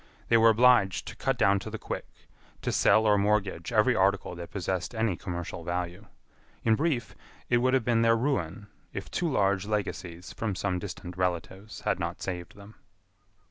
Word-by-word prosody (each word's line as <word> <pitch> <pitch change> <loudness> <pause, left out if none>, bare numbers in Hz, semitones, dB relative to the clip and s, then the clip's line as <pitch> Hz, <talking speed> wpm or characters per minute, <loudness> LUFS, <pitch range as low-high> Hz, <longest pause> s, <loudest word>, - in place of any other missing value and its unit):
They 115 - +6
were 115 0 +6
obliged 110 -4 +4
to - - -9
cut 135 -2 -1
down 100 -4 +4
to 105 - -7
the 110 - -5
quick, - - -5 0.6
to - - 0
sell 110 +2 +4
or 105 -1 +4
mortgage 100 -3 0
every 120 +2 +4
article 100 -2 +1
that 85 -1 -8
possessed 95 +2 -3
any 110 -4 +1
commercial 85 -1 -5
value. 90 +4 -4 0.6
In 115 - +4
brief, 140 -1 0 0.4
it 120 - +5
would 130 +2 +3
have 130 -4 +1
been 115 -2 +3
their 115 0 +4
ruin, 105 - -1 0.3
if - - -6
two 170 -3 -1
large 100 -4 +1
legacies 90 -4 -4
from 110 -4 -3
some 90 -1 -1
distant 90 -2 -7
relatives 90 +3 -3
had - - 0
not - - -3
saved 90 -2 -5
them. 100 +1 -13
100 Hz, 180 wpm, -28 LUFS, 90-115 Hz, 0.6 s, They